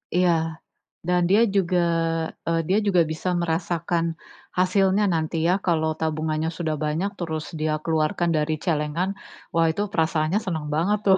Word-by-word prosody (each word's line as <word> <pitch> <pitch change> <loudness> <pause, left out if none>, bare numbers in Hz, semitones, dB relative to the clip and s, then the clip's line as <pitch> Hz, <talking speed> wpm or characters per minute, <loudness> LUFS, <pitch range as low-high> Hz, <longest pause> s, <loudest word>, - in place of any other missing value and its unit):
Iya, 180 -1 +4 0.8
dan 180 0 +3
dia 205 +4 +5
juga 185 -2 +2 0.7
e - - +1 0.2
dia 195 - +4
juga 180 -3 +4
bisa 160 +3 -2
merasakan 170 0 0 0.5
hasilnya 190 +2 +3
nanti 160 0 -1
ya, 180 - +4
kalau 160 -3 +2
tabungannya 155 0 -1
sudah 160 -3 -1
banyak 165 +7 -1
terus 160 -3 -3
dia 155 0 0
keluarkan 160 +1 +1
dari 155 +1 0
celengan 160 +2 0 0.4
wah 165 0 +3
itu 165 - -3
perasaannya 160 0 +1
seneng 160 -5 -2
banget 190 +7 +1
tuh. 190 -1 +6
165 Hz, 145 wpm, -24 LUFS, 155-185 Hz, 0.8 s, tuh